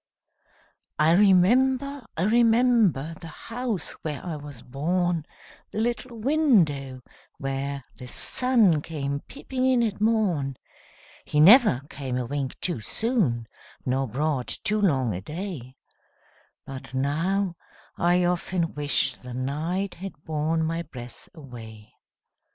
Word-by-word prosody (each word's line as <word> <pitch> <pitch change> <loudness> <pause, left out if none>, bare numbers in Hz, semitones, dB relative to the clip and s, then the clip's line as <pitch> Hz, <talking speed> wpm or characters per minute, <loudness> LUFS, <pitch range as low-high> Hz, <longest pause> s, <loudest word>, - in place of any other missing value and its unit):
I 155 +2 +4
remember, 250 +9 +4
I 165 - +1
remember, 225 - +3
The 165 - -8
house 230 +3 -4
where 150 0 -5
I 170 -3 -3
was 145 -4 -9
born, 165 +4 -1 0.4
The - - -4
little 240 +1 -2
window 190 - +2 0.4
where 135 0 -3
the 125 - -9
sun 195 - +3
Came 140 -3 -3
peeping 260 - -5
in 255 -2 +3
at 210 -3 -2
morn; 185 - +1 0.7
He 150 - -1
never 200 - +7
came 135 -4 -4
a 125 - -2
wink 135 0 -4
too 175 -9 -1
soon, 160 - +1 0.4
Nor 130 +1 0
brought 135 +1 -1 0.2
too 215 +1 +1
long 130 - +2
a 90 - -4
day, 150 - -6 0.9
But 135 -1 -8
now, 170 +8 0 0.4
I 175 +1 +2
often 175 -1 -1
wish 145 0 0
the 125 -1 -9
night 160 +9 -2
Had 175 -4 -9
borne 160 +1 0
my 165 +1 -1
breath 125 -7 -11
away! 110 -7 -11
165 Hz, 120 wpm, -26 LUFS, 135-210 Hz, 0.9 s, never